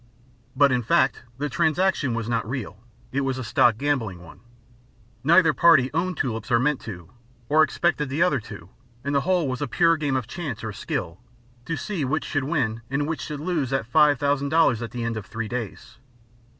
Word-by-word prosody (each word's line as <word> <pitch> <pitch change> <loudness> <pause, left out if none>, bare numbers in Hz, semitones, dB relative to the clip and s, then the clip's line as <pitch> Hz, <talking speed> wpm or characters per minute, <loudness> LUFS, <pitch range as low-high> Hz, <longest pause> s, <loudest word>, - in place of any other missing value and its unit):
But 140 -1 +5
in 125 -1 +1
fact 115 - +2 0.2
the 145 +2 -2
transaction 155 -2 +1
was 115 -1 -3
not 115 -2 -1
real, 120 -6 -5 0.3
it 140 - 0
was 135 -1 -1
a 130 - -4
stock 115 0 +3
gambling 120 -9 -1
one; 85 - -14 0.8
neither 165 +1 +5
party 140 -3 +5
owned 175 +2 -1
tulips 115 -4 -3
or 120 - +4
meant 135 +3 +1
to, 90 -5 -9 0.4
or 155 +2 +5
expected 155 -1 +1
the 145 +6 +1
other 175 -7 +2
to; 85 -5 -11 0.3
and 140 +1 -2
the 140 - +3
whole 180 -2 +1
was 130 0 -3
a 145 - -1
pure 165 +5 +3
game 145 -3 -1
of 130 -3 -1
chance 140 - -6
or 110 -2 -4
skill, 85 -2 -4 0.5
to 165 +1 -3
see 195 -8 -3
which 140 +4 -1
should 145 -2 -1
win 125 -8 -1
and 145 +2 -1
which 165 0 -3
should 150 -1 -5
lose 155 -5 -1
that 135 -3 -3
$5,000 145 -3 +3
at 115 - -4
the 120 -1 -5
end 115 -1 -2
of 105 - -7
three 110 0 -4
days. 120 0 -6
135 Hz, 195 wpm, -24 LUFS, 115-155 Hz, 0.8 s, But